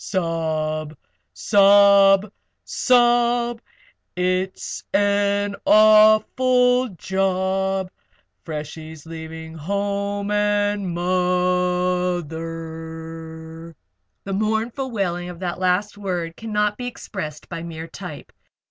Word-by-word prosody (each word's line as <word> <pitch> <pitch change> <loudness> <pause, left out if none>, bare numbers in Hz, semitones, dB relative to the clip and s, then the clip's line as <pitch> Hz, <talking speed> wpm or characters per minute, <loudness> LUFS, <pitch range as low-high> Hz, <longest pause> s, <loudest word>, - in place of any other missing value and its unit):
Sob! 155 -4 -2 0.4
Sob! 200 0 +5 0.3
Sob! 240 -1 +2 0.5
It's 185 +1 -2
an 205 0 +1
awful 235 +4 +5
job 190 0 -1 0.5
Freshie's 155 0 -7
leaving 160 0 -8
home 200 +4 -2
and 205 -1 +1
mo 180 0 +1
o 175 - -5
ther!" 160 0 -8 0.5
The 195 - -5
mournful 220 +6 -1
wailing 180 -6 -2
of 175 - -8
that 180 -1 -3
last 185 +3 0
word 175 -4 -3
cannot 210 -2 -1
be 245 - -5
expressed 155 -10 -7
by 170 -1 -6
mere 165 -1 -7
type. - - -9
190 Hz, 85 wpm, -22 LUFS, 165-205 Hz, 0.5 s, Sob